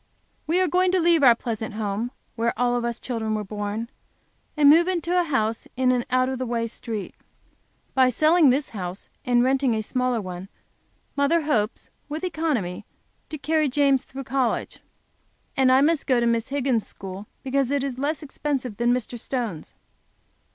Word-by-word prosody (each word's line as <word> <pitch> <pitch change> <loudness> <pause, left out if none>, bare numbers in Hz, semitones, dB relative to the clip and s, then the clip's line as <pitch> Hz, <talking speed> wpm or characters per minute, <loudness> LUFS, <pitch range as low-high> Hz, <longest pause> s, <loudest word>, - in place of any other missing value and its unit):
We 335 +4 +2
are 370 - +3
going 365 +2 +2
to 375 - +3
leave 335 -2 +4
our 245 -4 +7
pleasant 220 -2 -4
home, 215 +2 -2 0.3
where 230 0 -1
all 245 0 +2
of 240 - -1
us 235 0 -2
children 220 -3 -2
were 210 - -2
born, 205 +2 -4 0.7
and 295 -1 +5
move 330 +4 +7
into 350 -1 -1
a 355 -1 +3
house 230 -7 -1
in 255 -1 +3
an 245 -1 0
out 255 0 +2
of 260 -1 -3
the 255 - -2
way 230 -1 -1
street. 225 -3 -5 0.8
By 260 -1 +5
selling 310 +4 +4
this, 275 +3 +1 0.5
and 245 -1 +3
renting 260 -2 +2
a 220 - -2
smaller 250 +1 0
one, 185 -1 -7 0.7
mother 290 +4 +2
hopes, 230 -7 -1 0.2
with 310 +3 -5
economy, 300 - -2 0.5
to 310 - -5
carry 305 0 +1
James 275 -1 +3
through 270 +1 -8
college. 255 -1 -1 0.8
And 260 -1 +4
I 260 +1 +6
must 315 +1 +2
go 255 -3 +3
to 235 - +1
Miss 230 0 0
Higgins' 265 -5 0
school 195 +2 -8 0.2
because 270 -1 0
it 280 -1 0
is 265 -2 -4
less 300 +3 -1
expensive 270 -6 -3
than 240 +1 +2
Mr. 245 -1 -4
Stone's. 230 - -4
255 Hz, 175 wpm, -24 LUFS, 230-290 Hz, 0.8 s, our